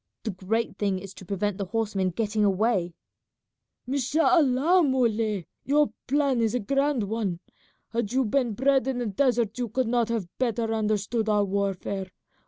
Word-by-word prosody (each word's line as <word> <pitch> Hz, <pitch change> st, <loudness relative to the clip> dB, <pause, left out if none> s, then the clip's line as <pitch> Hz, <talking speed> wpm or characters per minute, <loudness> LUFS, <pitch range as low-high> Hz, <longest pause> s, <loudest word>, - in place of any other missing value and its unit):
The 220 Hz, -, -2 dB
great 205 Hz, +5 st, -2 dB
thing 200 Hz, -2 st, +1 dB
is 195 Hz, +1 st, -8 dB
to 190 Hz, -, -12 dB
prevent 200 Hz, +1 st, -2 dB
the 200 Hz, -, -1 dB
horsemen 205 Hz, -2 st, -1 dB
getting 215 Hz, +3 st, -1 dB
away." 195 Hz, -3 st, +1 dB, 0.9 s
"Mashallah, 285 Hz, +4 st, +3 dB
Muley, 225 Hz, -, +1 dB, 0.2 s
your 290 Hz, -4 st, +2 dB
plan 275 Hz, -3 st, +2 dB
is 225 Hz, +1 st, +1 dB
a -, -, +1 dB
grand 275 Hz, +2 st, +1 dB
one. 200 Hz, -4 st, -2 dB, 0.5 s
Had 230 Hz, -3 st, -2 dB
you 260 Hz, +1 st, +2 dB
been 240 Hz, 0 st, +1 dB
bred 265 Hz, +3 st, +2 dB
in 265 Hz, -2 st, -1 dB
the 245 Hz, -, -2 dB
desert 235 Hz, +1 st, +1 dB
you 240 Hz, -2 st, -2 dB
could 255 Hz, +2 st, 0 dB
not 235 Hz, -1 st, +1 dB
have 230 Hz, -5 st, -1 dB
better 230 Hz, -2 st, 0 dB
understood 215 Hz, +1 st, 0 dB
our 205 Hz, -1 st, +3 dB
warfare. 195 Hz, -1 st, -2 dB
225 Hz, 160 wpm, -26 LUFS, 200-255 Hz, 0.9 s, Mashallah